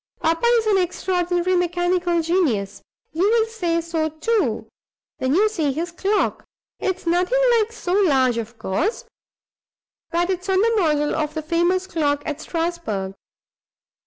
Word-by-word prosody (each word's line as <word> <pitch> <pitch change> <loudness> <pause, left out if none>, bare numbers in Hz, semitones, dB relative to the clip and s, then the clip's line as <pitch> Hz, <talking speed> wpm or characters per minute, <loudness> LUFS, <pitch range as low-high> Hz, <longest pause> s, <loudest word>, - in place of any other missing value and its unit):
Papa 330 +8 +1
is 450 - 0
an 410 -3 +3
extraordinary 360 0 0
mechanical 350 -1 +1
genius. 310 - 0 0.3
You 360 +6 +2
will 450 0 +3
say 350 -7 -1
so, 325 -1 -1
too, 405 +9 -1 0.5
when 260 +3 +1
you 420 +4 +4
see 325 -10 -1
his 335 +5 -3
clock. 395 +4 0 0.4
It's 375 -2 -2
nothing 360 +8 +2 0.2
like 435 +1 -1
so 365 -6 -4
large, 265 - +3
of 230 +1 -7
course, 320 - -2 1.0
but 345 +2 0
it's 370 +1 -4
on 380 0 +3
the 460 +3 +3
model 300 -7 +1
of 305 0 -2
the 315 - -3
famous 345 +4 +1
clock 290 -5 -1
at 300 -1 -4
Strasbourg. 325 - -3
345 Hz, 145 wpm, -22 LUFS, 310-375 Hz, 1.0 s, you